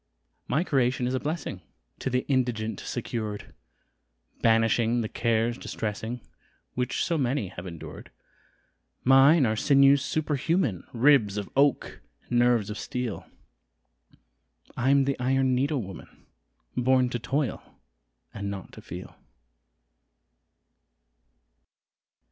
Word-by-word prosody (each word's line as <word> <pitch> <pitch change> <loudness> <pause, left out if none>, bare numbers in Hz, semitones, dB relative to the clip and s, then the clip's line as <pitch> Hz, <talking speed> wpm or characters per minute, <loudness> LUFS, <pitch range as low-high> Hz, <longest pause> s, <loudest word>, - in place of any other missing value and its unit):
My 145 +7 +1
creation 130 -5 +1
is 125 - -1
a 130 - 0
blessing 150 - -4 0.4
To - - -2
the 125 0 0
indigent 115 -6 0
secured, 110 -4 -5 0.9
Banishing 115 +1 +3
the 110 - -2
cares 115 +2 0
distressing 110 +3 -4 0.5
Which 125 0 -1
so 170 -3 0
many 130 -6 0
have 90 0 -8
endured: 85 -3 -9 0.9
Mine 135 +3 +6
are 110 -1 +1
sinews 140 +2 +5
superhuman, 155 - 0
Ribs 120 -5 +4
of 100 - -4
oak 140 0 +1 0.2
and 120 - 0
nerves 120 -4 +3
of 105 - -6
steel 125 -4 -4 1.5
I'm 135 +2 +3
the 140 -1 -1
Iron 130 +1 +2
Needle 135 0 0
Woman 95 -2 -9 0.7
Born 130 0 +3
to 120 - -2
toil 135 +2 -1 0.7
and 100 -1 -4
not 100 -2 -7
to - - -12
feel. - - -9
125 Hz, 110 wpm, -27 LUFS, 110-135 Hz, 1.5 s, Mine